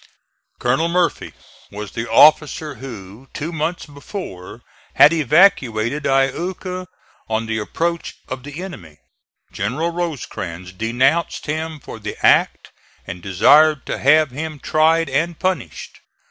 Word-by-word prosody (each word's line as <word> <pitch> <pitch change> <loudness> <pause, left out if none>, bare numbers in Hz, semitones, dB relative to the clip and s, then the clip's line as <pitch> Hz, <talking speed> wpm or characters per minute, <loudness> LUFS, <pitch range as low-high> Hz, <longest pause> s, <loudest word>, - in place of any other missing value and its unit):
Colonel 130 +7 +1
Murphy 175 0 0 0.4
was 105 0 -7
the 115 0 -5
officer 150 +4 +4
who, 115 -1 -10
two 155 +4 -4
months 165 +2 -3
before, 145 - -9 0.3
had 150 - +7
evacuated 145 - +2
Iuka 180 +7 -1 0.4
on 110 +1 -1
the 110 0 -2
approach 170 +10 -3
of 130 0 -6
the 145 +6 -8
enemy. 85 - -10 0.5
General 135 +12 -2
Rosecrans 110 - -5
denounced 130 - 0
him 155 +1 -4
for 115 - -10
the 105 0 -6
act - - +3 0.3
and 90 +1 -7
desired 145 - +4
to - - -4
have 150 +1 +4
him 155 +3 -5
tried 160 +3 +2
and 155 +5 -1
punished. 185 0 -4
145 Hz, 120 wpm, -20 LUFS, 115-165 Hz, 0.5 s, had